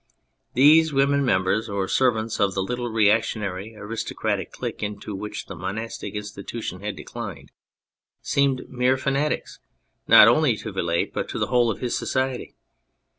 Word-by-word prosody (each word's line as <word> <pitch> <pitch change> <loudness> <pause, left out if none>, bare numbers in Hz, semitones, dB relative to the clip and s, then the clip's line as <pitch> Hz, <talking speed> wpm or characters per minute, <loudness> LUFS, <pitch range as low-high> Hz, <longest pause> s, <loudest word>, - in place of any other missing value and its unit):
These 155 +5 +6
women, 140 0 +2
members 100 -1 +1
or 100 -1 -1
servants 115 -3 +1
of 100 -2 +2
the 95 - 0
little 120 +3 -3
reactionary 110 -2 0
aristocratic 110 +2 -3
clique - - -6
into 105 0 -5
which 105 +2 -6
the - - -8
monastic 100 +3 -5
institution 105 -1 -6
had 105 +1 -4
declined, - - -8 0.7
seemed 140 -2 0
mere 125 +1 +1
fanatics 140 +3 -1 0.5
not - - +9
only 120 -1 +4
to 110 - -6
Vilate 85 -3 -1
but - - -3
to - - -4
the - - -1
whole 120 -1 +4
of 110 - -3
his 125 - -1
society. 130 -1 -2
110 Hz, 145 wpm, -24 LUFS, 100-130 Hz, 0.7 s, not